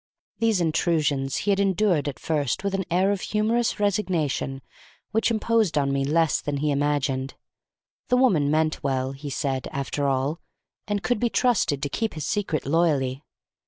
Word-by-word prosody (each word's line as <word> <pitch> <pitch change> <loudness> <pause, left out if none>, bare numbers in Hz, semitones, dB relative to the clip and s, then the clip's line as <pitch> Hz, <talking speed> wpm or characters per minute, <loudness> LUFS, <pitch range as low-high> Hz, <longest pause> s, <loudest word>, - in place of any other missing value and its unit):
These 225 -4 +2
intrusions 150 -5 +1
he 205 - +3
had 195 - +2
endured 190 -6 +2
at 140 - -4
first 150 0 -1
with 200 -1 -1
an 195 -1 -1
air 185 +3 +2
of 200 -2 -2
humorous 225 +2 0
resignation 175 -10 -1 0.5
which 225 +2 +2
imposed 225 -6 +1
upon 140 -1 +1
me 135 0 0
less 160 +3 +2
than 145 -1 -2
he 150 +1 0
imagined. 140 -2 0 0.7
The 250 - +3
woman 185 - +3
meant 155 +1 +1
well, 130 -1 -1
he 140 +2 -7
said, 135 -2 -2
after 140 +1 -2
all, 135 +4 0 0.5
and 205 -1 -2
could 245 -3 0
be 240 - +1
trusted 220 - +1
to - - +1
keep 225 +7 -2
his 155 - -4
secret 190 -8 -1
loyally. 140 -4 +1
155 Hz, 165 wpm, -25 LUFS, 140-200 Hz, 0.7 s, he